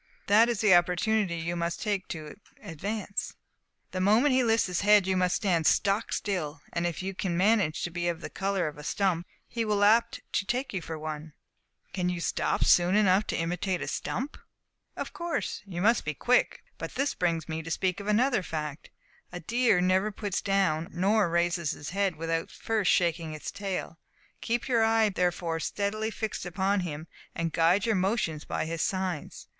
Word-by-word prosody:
That 220 +4 +5
is 235 -3 -1
the 210 -4 +6
opportunity 180 +2 +2
you 170 +1 -3
must 170 0 -2
take 205 -3 -2
to 155 -3 -7 0.3
advance. 200 +5 -4 0.6
The 185 - -2
moment 225 +9 +4
he 255 0 +4
lifts 225 -1 +3
his 180 -2 -1
head 205 -1 +5
you 190 0 +1
must 180 -1 +2
stand 170 -6 +1
stock 200 +3 +2
still; 160 -7 -2
and 170 0 0
if 175 +1 -4
you 195 +1 -3
can 180 -2 -2
manage 195 -5 +2
to 175 - -3
be 175 0 -2
of 170 -1 -1
the - - -6
colour 195 -3 -1
of 150 -1 -7
a - - -9
stump, 175 0 0 0.2
he 230 -1 -2
will 210 -2 0
be - - +6
apt 225 +3 +3
to - - +1
take 255 +1 -2
you 190 - -2
for 165 -1 -6
one." 155 0 -6 0.5
"But - - -37
can 180 -2 0
you 180 -1 -2
stop - - 0
soon 180 +2 +4
enough 205 -1 +4
to - - -1
imitate 180 +2 -1
a - - -5
stump!" 270 +5 -4 0.6
"Of - - -5
course 340 -1 -3
you 175 -2 -4
must 230 +3 +4
be 150 0 -3
quick; 250 - +2 0.2
but - - -6
this 280 +2 0
brings 165 -3 -1
me 160 0 -3
to 165 - -8
speak 185 +3 -1
of 200 - -7
another 235 +2 +3
fact. 150 -4 -5 0.4
A 175 - -6
deer 230 +1 +2
never 185 +3 +2
puts 205 -1 -3
down 185 -5 +1
nor 195 +2 +2
raises 170 -2 +1
his 145 - -7
head 195 -2 0
without 165 +1 -2
first 220 -5 -1
shaking 170 -2 +1
his 155 - -6
tail. 195 -4 -4 0.4
Keep 240 +1 -1
your 235 -3 +3
eye 225 -1 +3
therefore 175 -3 -1
steadily 210 +5 -2
fixed 220 -1 -4
upon 190 +3 0
him, 160 -4 -4 0.3
and 165 -1 -2
guide 170 +4 +3
your 225 - +2
motions 185 -5 0
by - - -2
his 165 0 -3
signs. 185 -5 -3
185 Hz, 195 wpm, -28 LUFS, 170-210 Hz, 0.6 s, the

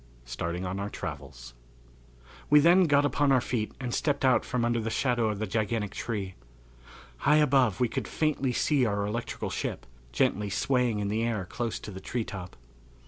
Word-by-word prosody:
Starting 85 +9 -4
on 95 +2 -3
our 100 +1 -3
Travels. 70 - -7 1.0
We 150 - +7
then 175 +4 +6
got 145 -2 +4
upon 145 0 +2
our 130 - +5
feet 115 -3 -2
and 125 -3 -4
stepped 145 -2 0
out 130 -1 +4
from 125 -3 -1
under 120 0 +1
the 115 0 -2
shadow 120 -2 +1
of 105 - -2
the 110 - -2
gigantic 110 0 -1
tree. 100 -5 -4 0.8
High 150 - +3
above 130 -8 +3
we 125 - +3
could - - -4
faintly 150 -4 0
see 140 +2 +2
our 100 -3 0
electrical 115 +3 -4
ship, - - -4 0.3
gently 100 +11 +1
swaying 125 +2 +1
in 105 -1 -1
the 110 +2 0
air 115 -5 -1
close 115 +5 -3
to 105 - -8
the 95 -1 -8
treetop. 100 -6 -5
115 Hz, 180 wpm, -28 LUFS, 100-130 Hz, 1.0 s, We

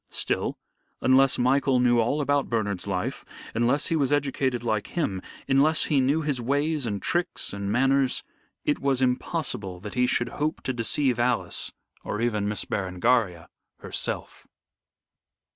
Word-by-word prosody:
Still, - - -1 0.4
unless 130 +1 +4
Michael 130 +1 +3
knew 120 -1 +4
all 120 +6 +1
about 145 0 +1
Bernard's 100 -5 -1
life, 95 -2 -2 0.3
unless 120 +5 +1
he 165 - +1
was 140 -4 +1
educated 135 -4 0
like 110 -3 -1
him, 100 - -2 0.3
unless 145 +3 +4
he 140 -3 +2
knew 145 +5 +1
his 145 -5 0
ways 145 +2 0
and 100 -2 -2
tricks 175 - -1
and 100 0 -3
manners, 135 +2 +2 0.4
it 145 - +1
was 135 -1 +1
impossible 125 - -2
that 105 0 -7
he 125 0 +2
should 120 -1 +1
hope 150 +2 -2
to 130 - -1
deceive 120 +2 +1
Alice 120 -1 0 0.3
or 105 - -3
even 105 -3 0
Miss 105 - -2
Berengaria 95 -2 0 0.3
herself. - - -4
125 Hz, 145 wpm, -26 LUFS, 110-140 Hz, 0.4 s, unless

